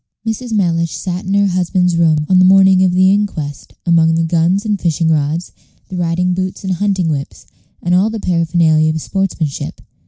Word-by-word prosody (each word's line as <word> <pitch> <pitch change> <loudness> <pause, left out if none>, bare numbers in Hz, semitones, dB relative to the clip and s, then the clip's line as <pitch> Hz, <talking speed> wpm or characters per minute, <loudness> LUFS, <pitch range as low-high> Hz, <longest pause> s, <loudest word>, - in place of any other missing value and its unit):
Mrs. 225 +2 -4
Mellish 170 -5 0
sat 180 0 -5
in 195 +2 -1
her 200 0 +3
husband's 180 -1 0
room 160 -3 +2
on 185 +1 +3
the - - +5
morning 190 0 +5
of 185 - +3
the 185 +1 +3
inquest, 160 -9 -4
among 165 -1 +3
the 165 - +1
guns 170 +5 +1
and 210 -2 -1
fishing 165 -1 0
rods, 155 +2 -1 0.4
the 185 - -7
riding 180 +1 0
boots 185 +1 -4
and 190 -1 -1
hunting 190 -1 -1
whips, 140 -2 -5 0.4
and 175 - 0
all 190 +4 +3
the 225 0 -5
paraphernalia 165 -3 +1
of 160 0 -2
sportsmanship. 175 -5 -3
180 Hz, 185 wpm, -15 LUFS, 165-190 Hz, 0.4 s, the